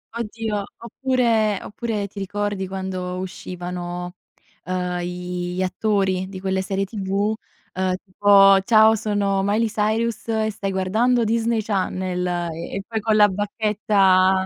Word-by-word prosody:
Oddio, 220 Hz, -2 st, -3 dB
oppure 235 Hz, -4 st, +1 dB
oppure 215 Hz, -2 st, -3 dB
ti 200 Hz, +1 st, -9 dB
ricordi 200 Hz, 0 st, -2 dB
quando 185 Hz, -1 st, -4 dB
uscivano, 180 Hz, -1 st, -6 dB, 0.5 s
uhm, 180 Hz, -1 st, -2 dB
i 180 Hz, 0 st, -4 dB
gli 185 Hz, -, -1 dB
attori 190 Hz, -1 st, 0 dB
di 190 Hz, -1 st, -7 dB
quelle 190 Hz, 0 st, -1 dB
serie 195 Hz, +1 st, -1 dB
TV? 200 Hz, +1 st, -1 dB, 0.4 s
Uhm, 185 Hz, 0 st, 0 dB
tipo: 195 Hz, 0 st, +6 dB
"Ciao 220 Hz, +1 st, +6 dB
sono 205 Hz, -2 st, 0 dB
Miley 210 Hz, +3 st, +2 dB
Cyrus, 220 Hz, +2 st, -1 dB
e 220 Hz, -1 st, 0 dB
stai 200 Hz, -1 st, -4 dB
guardando 220 Hz, +6 st, +1 dB
Disney 230 Hz, 0 st, +1 dB
Channel!" 185 Hz, -3 st, -1 dB
E 170 Hz, -1 st, -3 dB
e 195 Hz, -, -3 dB
poi 225 Hz, -1 st, -2 dB
con 215 Hz, 0 st, +1 dB
la 210 Hz, -1 st, +7 dB
bacchetta, 195 Hz, -2 st, +2 dB
195 Hz, 135 wpm, -22 LUFS, 185-215 Hz, 0.5 s, la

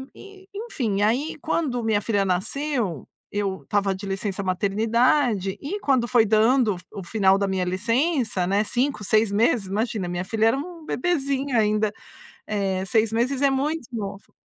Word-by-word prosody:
e 395 Hz, -1 st, -14 dB
enfim 250 Hz, -, -2 dB
aí 260 Hz, +9 st, +1 dB
quando 275 Hz, -7 st, -1 dB
minha 215 Hz, -2 st, +1 dB
filha 205 Hz, -2 st, +1 dB
nasceu, 195 Hz, -, -2 dB, 0.2 s
eu 200 Hz, -2 st, -2 dB
estava 200 Hz, -1 st, 0 dB
de 200 Hz, -, -8 dB
licença-maternidade, 205 Hz, +3 st, +1 dB
e 395 Hz, +9 st, -4 dB
quando 260 Hz, -4 st, +2 dB
foi 240 Hz, -2 st, +4 dB
dando 220 Hz, +1 st, +3 dB
o -, -, -8 dB
f 180 Hz, -, -14 dB
o 195 Hz, -3 st, -6 dB
final 195 Hz, 0 st, +3 dB
da 200 Hz, -, 0 dB
minha 190 Hz, -1 st, -1 dB
licença, 230 Hz, -, 0 dB
né, 200 Hz, +2 st, +2 dB
5, 250 Hz, +1 st, -1 dB
6 215 Hz, +1 st, +2 dB
meses, 210 Hz, -1 st, +2 dB
imagina 210 Hz, -1 st, -2 dB
minha 175 Hz, 0 st, -2 dB
filha 220 Hz, +3 st, +1 dB
era 230 Hz, -, +2 dB
um 330 Hz, +2 st, -7 dB
bebezinho 275 Hz, -5 st, -1 dB
ainda, 215 Hz, -1 st, +2 dB, 0.6 s
eh, 195 Hz, -3 st, -1 dB
6 220 Hz, +2 st, +2 dB
meses 255 Hz, +4 st, 0 dB
é 280 Hz, -, +5 dB
muito 285 Hz, +2 st, -1 dB
novo. 200 Hz, -3 st, -6 dB
220 Hz, 160 wpm, -24 LUFS, 195-265 Hz, 0.6 s, é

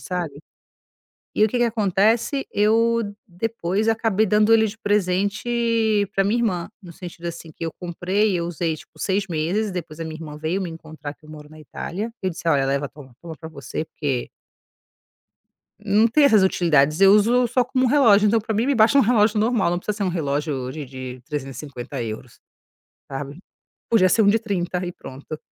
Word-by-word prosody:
sabe. 175 Hz, -6 st, -4 dB, 1.0 s
E 215 Hz, -, +3 dB
o -, -, +5 dB
que 235 Hz, -, -2 dB
que 240 Hz, -, +3 dB
acontece? 225 Hz, +4 st, +1 dB
Eu 225 Hz, 0 st, +2 dB
depois 200 Hz, +1 st, -2 dB
acabei 225 Hz, -2 st, +2 dB
dando 210 Hz, +2 st, +4 dB
ele 220 Hz, -1 st, +5 dB
de 210 Hz, -, -8 dB
presente 210 Hz, +2 st, +1 dB
para 195 Hz, -, +2 dB
minha 215 Hz, +5 st, +1 dB
irmã, 185 Hz, -8 st, -1 dB
no 175 Hz, -, -11 dB
sentido 170 Hz, 0 st, -10 dB
assim, 170 Hz, -1 st, -7 dB
que 160 Hz, -, -8 dB
eu 165 Hz, -, -3 dB
comprei, 185 Hz, +4 st, 0 dB
eu 170 Hz, -, -2 dB
usei, 170 Hz, -1 st, -2 dB
tipo, 155 Hz, -, -17 dB
6 195 Hz, +3 st, 0 dB
meses, 175 Hz, +7 st, -1 dB
depois 165 Hz, -3 st, -6 dB
a -, -, -3 dB
minha 160 Hz, -1 st, -6 dB
irmã 155 Hz, -2 st, -8 dB
veio 165 Hz, +5 st, -2 dB
me 180 Hz, -, -3 dB
encontrar, 155 Hz, -2 st, -9 dB
que 155 Hz, -, -23 dB
eu -, -, -15 dB
moro 150 Hz, -1 st, -11 dB
na 155 Hz, -, -14 dB
Itália, 195 Hz, -, -5 dB
eu 190 Hz, -, 0 dB
disse: 170 Hz, -1 st, -7 dB
"Olha, 140 Hz, -4 st, +3 dB
leva, 140 Hz, +1 st, 0 dB
toma, 135 Hz, -4 st, -15 dB
toma 165 Hz, -2 st, -8 dB
pra 160 Hz, -1 st, -9 dB
você, 160 Hz, 0 st, -5 dB
porque" 140 Hz, -6 st, -3 dB, 1.5 s
Não 210 Hz, +2 st, +3 dB
tem 285 Hz, +6 st, +3 dB
essas 215 Hz, -8 st, +6 dB
utilidades. 155 Hz, -4 st, +3 dB
Eu 195 Hz, 0 st, +8 dB
uso 235 Hz, +4 st, +4 dB
só 250 Hz, +1 st, +2 dB
como 255 Hz, +1 st, 0 dB
um -, -, +3 dB
relógio, 225 Hz, -7 st, +5 dB
então 225 Hz, +2 st, +3 dB
pra 220 Hz, +1 st, -3 dB
mim 225 Hz, +4 st, +1 dB
me 280 Hz, -, +2 dB
basta 230 Hz, +5 st, +5 dB
um -, -, +8 dB
relógio 220 Hz, -2 st, +3 dB
normal, 220 Hz, -4 st, +2 dB
não 175 Hz, -, 0 dB
precisa 205 Hz, +3 st, -4 dB
ser 200 Hz, -, 0 dB
um -, -, +1 dB
relógio 145 Hz, -5 st, -2 dB
de 150 Hz, +2 st, -6 dB
de 130 Hz, -1 st, -8 dB
350€, 130 Hz, -4 st, -6 dB, 0.7 s
sabe. 140 Hz, +2 st, -6 dB, 0.5 s
Podia 190 Hz, -5 st, +4 dB
ser 225 Hz, -, +3 dB
um 205 Hz, -, +4 dB
de 215 Hz, +3 st, +4 dB
30€ 185 Hz, -4 st, -2 dB
e 175 Hz, -, -4 dB
pronto. 150 Hz, -2 st, -9 dB
185 Hz, 195 wpm, -22 LUFS, 155-220 Hz, 1.5 s, Eu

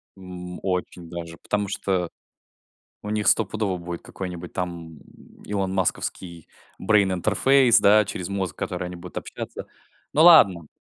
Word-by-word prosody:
М. 90 Hz, -2 st, -9 dB
Очень 90 Hz, -2 st, -3 dB
даже. 85 Hz, -1 st, -7 dB
Потому 105 Hz, -1 st, -1 dB
что 95 Hz, -3 st, -1 dB, 0.9 s
у 105 Hz, -, -7 dB
них 105 Hz, -1 st, -1 dB
стопудово 105 Hz, -3 st, +1 dB
будет 85 Hz, 0 st, -7 dB
какой-нибудь 90 Hz, -2 st, -7 dB
там 85 Hz, -3 st, -5 dB, 0.5 s
Илон 95 Hz, -2 st, -2 dB
Масковский 90 Hz, -2 st, -3 dB, 0.3 s
брейн-интерфейс, 105 Hz, +6 st, +3 dB
да, 105 Hz, +2 st, +6 dB
через 90 Hz, -2 st, -5 dB
мозг, 95 Hz, -5 st, -3 dB
который 90 Hz, -, -4 dB
они 90 Hz, -, -7 dB
будут 85 Hz, -, -10 dB
общаться. -, -, -7 dB, 0.5 s
Ну 155 Hz, -, +4 dB
ладно. 100 Hz, -, +7 dB
95 Hz, 130 wpm, -24 LUFS, 90-105 Hz, 0.9 s, ладно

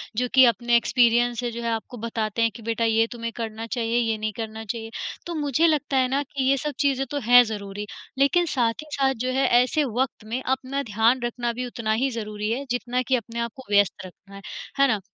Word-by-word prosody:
जो 250 Hz, +3 st, 0 dB
कि 260 Hz, -, +9 dB
अपने 240 Hz, +1 st, +2 dB
एक्सपीरियंस 240 Hz, 0 st, +3 dB
से 240 Hz, -1 st, -2 dB
जो 235 Hz, +1 st, -6 dB
है 235 Hz, -, -1 dB
आपको 230 Hz, +2 st, -4 dB
बताते 225 Hz, -1 st, -2 dB
हैं 230 Hz, 0 st, +3 dB
कि 230 Hz, -, -10 dB
बेटा 230 Hz, +1 st, -1 dB
ये 225 Hz, 0 st, +3 dB
तुम्हें 230 Hz, -1 st, -4 dB
करना 225 Hz, -1 st, -5 dB
चाहिए, 230 Hz, 0 st, -1 dB
ये 225 Hz, -2 st, 0 dB
नहीं 215 Hz, 0 st, -2 dB
करना 220 Hz, 0 st, -5 dB
चाहिए। 225 Hz, +2 st, -5 dB, 0.4 s
तो 340 Hz, -1 st, -4 dB
मुझे 295 Hz, +2 st, +2 dB
लगता 295 Hz, -3 st, +1 dB
है 255 Hz, -, +3 dB
ना 275 Hz, +2 st, +1 dB
कि 275 Hz, 0 st, -4 dB
ये 275 Hz, -, +4 dB
सब 300 Hz, +3 st, -2 dB
चीज़ें 270 Hz, -2 st, +1 dB
तो 290 Hz, -, -1 dB
हैं 245 Hz, 0 st, +9 dB
ज़रूरी, 205 Hz, -2 st, -5 dB, 0.3 s
लेकिन 280 Hz, +6 st, +3 dB
साथ 235 Hz, -3 st, +2 dB
ही 310 Hz, -, -16 dB
साथ 270 Hz, -1 st, +2 dB
जो 255 Hz, -, 0 dB
है 265 Hz, 0 st, +2 dB
ऐसे 300 Hz, +4 st, +1 dB, 0.2 s
वक़्त 260 Hz, -4 st, -1 dB
में 235 Hz, +4 st, -3 dB
अपना 265 Hz, +2 st, -1 dB
ध्यान 225 Hz, +3 st, +2 dB
रखना 240 Hz, 0 st, -2 dB
भी 250 Hz, +2 st, -4 dB
उतना 235 Hz, -3 st, -3 dB
ही 270 Hz, -, +2 dB
ज़रूरी 215 Hz, -1 st, -4 dB
है, 265 Hz, +4 st, -2 dB
जितना 245 Hz, +1 st, -1 dB
कि 260 Hz, +1 st, +1 dB
अपने 235 Hz, -1 st, -4 dB
आप 235 Hz, 0 st, -2 dB
को 265 Hz, -, -11 dB
व्यस्त 200 Hz, -2 st, +2 dB
रखना 195 Hz, +2 st, -14 dB
है, 195 Hz, -, -9 dB, 0.4 s
है 275 Hz, -, +6 dB
ना? 215 Hz, -5 st, +1 dB
235 Hz, 235 wpm, -24 LUFS, 225-260 Hz, 0.4 s, कि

